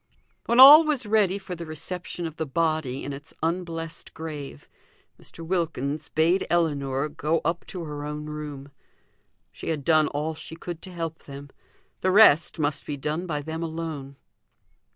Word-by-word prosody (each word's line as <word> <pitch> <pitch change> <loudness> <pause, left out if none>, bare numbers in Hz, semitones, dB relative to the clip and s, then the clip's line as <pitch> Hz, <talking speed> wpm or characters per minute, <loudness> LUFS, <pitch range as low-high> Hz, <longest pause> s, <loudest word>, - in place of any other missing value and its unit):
When 235 +1 +3
all 290 +5 +12
was 295 -6 -1
ready 205 -3 +2
for 190 -2 -7
the 170 -1 -7
reception 175 +3 -5
of 160 -1 -6
the 160 - -3
body 155 -3 -1
in 140 - -4
its 145 +3 -10
unblessed 165 -1 -3
grave, 150 - -7 0.5
Mr. 165 - -8
Wilkins 155 -4 -2
bade 170 +5 +2
Ellinor 145 -5 0
go 155 +2 -1
up 165 +2 -1
to 180 -3 -6
her 150 -2 -6
own 150 0 -5
room 150 -2 -7 0.8
she - - -7
had 155 -3 -2
done 155 -2 +4
all 150 +2 -2
she 160 +1 -9
could 170 0 -7
to 185 - -8
help 165 -2 -5
them; 140 0 -10 0.5
the 185 - +1
rest 185 -6 +6
must 145 -2 -2
be 145 - -3
done 155 +6 -3
by 150 -3 -2
them 160 +2 -5
alone. 160 -4 -5
160 Hz, 165 wpm, -25 LUFS, 145-170 Hz, 0.8 s, all